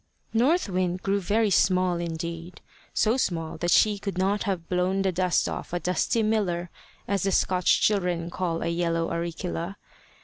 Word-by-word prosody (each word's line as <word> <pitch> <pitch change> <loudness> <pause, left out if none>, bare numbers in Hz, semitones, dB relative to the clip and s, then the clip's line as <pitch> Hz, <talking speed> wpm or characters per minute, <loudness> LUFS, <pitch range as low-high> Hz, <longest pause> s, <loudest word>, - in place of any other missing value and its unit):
North 270 +10 +3
Wind 185 -1 -1
grew 200 +1 +1
very 210 +3 +1
small 185 -1 +3
indeed, 170 +1 -5 0.3
so 225 +3 +2
small 165 -9 -2
that 175 - -1
she 210 +2 +4
could 200 -2 -4
not 195 +2 +1
have 185 -5 -2
blown 185 +2 0
the 190 - +1
dust 180 0 +1
off - - -5
a 175 - 0
dusty 180 +6 0
miller, 185 -6 0 0.4
as 200 -2 0
the 195 - +1
Scotch 185 -1 +2
children 180 -5 +1
call 170 -3 -2
a - - -2
yellow 170 -1 0
auricula. 170 +2 -3
180 Hz, 165 wpm, -26 LUFS, 170-200 Hz, 0.4 s, she